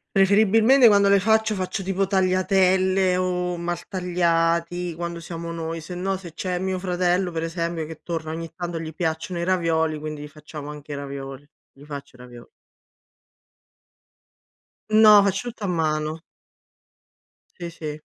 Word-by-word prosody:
Preferibilmente 220 +6 +5
quando 200 -1 +4
le 200 -1 +5
faccio, 220 0 +2
faccio 190 +2 -3
tipo 195 +1 0
tagliatelle 185 0 +2
o 180 -1 -1
maltagliati 170 -1 -1
quando 170 0 -5
siamo 170 0 -6
noi, 165 0 -4
sennò 180 +3 -3
se 175 -4 -11
c'è 180 +1 -3
mio 190 0 -2
fratello, 180 0 0
per 165 0 -3
esempio, 165 -1 -3
che 160 0 -10
torna 160 -2 -4
ogni 165 0 -6
tanto, 175 -1 -5
gli 160 -1 -6
piacciono 170 +2 -3
i 170 - -1
ravioli, 165 -4 +1
quindi 150 -1 -6
gli - - -7
facciamo 150 0 -10
anche 150 0 -9
i - - -3
ravioli, 140 0 -7 0.2
gli 140 +2 -17
faccio 140 -3 -9
i - - -25
ravioli. 120 -1 -13 2.4
No, 215 -1 +8
faccio 200 +5 -1
tutto 225 -2 -11
a - - -1
mano. 155 -2 -1 1.4
Sì, 170 -1 -5
sì. 155 -2 -7
175 Hz, 145 wpm, -23 LUFS, 160-190 Hz, 2.4 s, No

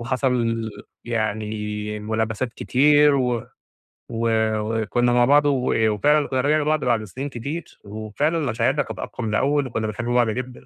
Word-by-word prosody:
وحصَل 120 -3 0 0.3
يعني 105 -2 -3
ملابسات 110 +2 -2
كتير، 145 +3 +4
و 125 -3 -1 0.6
و 115 0 -1 0.3
وكنا 115 +3 0
مع 120 0 +4
بعض 145 +3 +5
و 125 -5 +2
وفعلًا 150 +7 +2
كنا 130 -1 0
رِجِعنا 150 +3 +2
لبعض 155 -1 0
بعد 115 -3 +1
سنين 130 +8 -6
كتير، 140 +7 -6
وفعلًا 110 +10 -2
مشاعرنا 130 +1 0
كانت - - -8
أقوي 125 - -6
من 105 - -1
الأول 140 +1 +1
وكنا 110 -2 -2
بنحب 110 +3 -4
بعض 120 -1 +2
جدًا، 125 +2 -5
120 Hz, 150 wpm, -22 LUFS, 110-140 Hz, 0.6 s, بعض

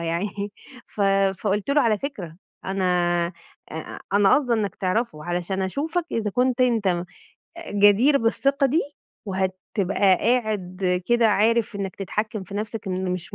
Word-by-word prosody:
يعني 170 +4 -1 0.6
ف - - -9 0.4
فقُلت 205 +6 -1
له 295 - +4
على 215 -3 +2
فكرة، 190 - -6 0.3
أنا 190 0 -2 0.9
أ 160 0 -7
أنا 200 -1 +4
قاصدة 250 -5 +2
إنك 205 -4 -1
تعرفه 185 -5 -2
علشان 175 +2 -2
أشوفك 315 - -2
إذا 215 -2 -1
كنت 250 +3 +1
أنت 230 -5 +2
م 175 -1 0 0.7
جدير 205 +8 +5
بالثقة 275 +4 +2
دي 305 +6 +2 0.4
وهتبقى 190 0 -2 0.2
قاعد 195 -6 0
كده 235 -2 +4
عارف 220 +1 +2
إنك 195 -2 -4
تتحكّم 210 +1 -3
في 195 - -10
نَفْسك، 215 0 -4
إن 185 0 -2
مش 180 -2 -6
205 Hz, 140 wpm, -24 LUFS, 185-235 Hz, 0.9 s, جدير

